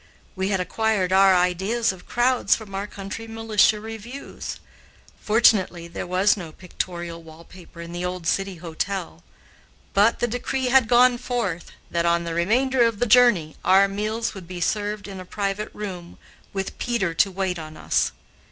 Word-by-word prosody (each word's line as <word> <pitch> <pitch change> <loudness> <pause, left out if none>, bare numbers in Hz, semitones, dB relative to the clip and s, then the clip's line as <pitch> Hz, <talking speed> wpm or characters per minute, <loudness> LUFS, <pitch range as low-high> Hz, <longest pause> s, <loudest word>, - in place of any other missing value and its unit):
We 190 0 -1
had 195 -1 0
acquired 195 -1 0
our 190 0 +6
ideas 190 +6 +1
of 185 -1 -13
crowds 240 -3 +2
from 215 -3 -10
our 195 +2 -3
country 205 +3 -7
militia 225 -1 +2
reviews. 225 +5 -8 0.6
Fortunately, 205 -6 +3
there 170 - -6
was 185 +3 +3
no 175 -6 -8
pictorial 170 -1 -6
wall 160 0 -14
paper 175 -1 -13
in 170 0 -8
the 175 +1 -4
old 180 -1 -4
City 195 +2 0
Hotel. 170 - -4 0.7
But 205 +4 +4
the 240 - 0
decree 250 +2 -2
had 260 -2 +5
gone 245 0 +5
forth 235 -9 -3 0.2
that, 170 0 +1
on 170 0 +2
the 170 -1 -4
remainder 245 +10 +2
of 230 -2 +1
the 245 - +1
journey, 230 -10 +4
our 195 +1 +5
meals 215 +3 -2
would 190 -4 -10
be 180 0 -7
served 205 +3 -2
in 195 -2 -8
a - - -7
private 200 +2 -3
room, 185 -5 -7 0.3
with 195 -1 -5
Peter 225 -8 -1
to 195 +4 +3
wait 190 -2 -2
on 155 -1 -9
us. - - +1
195 Hz, 170 wpm, -23 LUFS, 180-225 Hz, 0.7 s, our